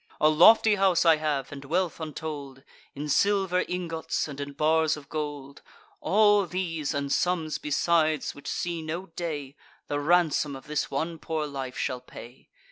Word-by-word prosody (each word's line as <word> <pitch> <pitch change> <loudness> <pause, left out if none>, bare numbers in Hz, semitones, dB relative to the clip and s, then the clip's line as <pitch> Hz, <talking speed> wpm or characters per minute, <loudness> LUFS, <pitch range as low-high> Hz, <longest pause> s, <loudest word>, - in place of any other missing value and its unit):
A 155 - +5
lofty 215 +8 +6
house 190 -3 +3
I 165 -1 +6
have, 150 -3 -2
and 140 -1 -8
wealth 170 +5 -1
untold, 145 -4 -6 0.3
In 145 +2 -5
silver 190 +3 +2
ingots, 170 -4 -2
and 145 -1 -7
in 140 0 -6
bars 160 +1 +2
of 145 -1 -13
gold: 145 -3 -5 0.4
All 205 +2 +4
these, 165 -4 -3
and 140 -1 -2
sums 170 -4 0
besides, 155 0 +1
which 145 - -12
see 170 -1 -2
no 165 +4 -4
day, 150 -5 -4 0.3
The 145 - -1
ransom 155 -2 +2
of 135 - -11
this 150 0 -2
one 160 +4 -3
poor 160 -1 -2
life 135 -3 -6
shall 125 -1 -2
pay. 125 0 -13
155 Hz, 160 wpm, -27 LUFS, 145-175 Hz, 0.4 s, lofty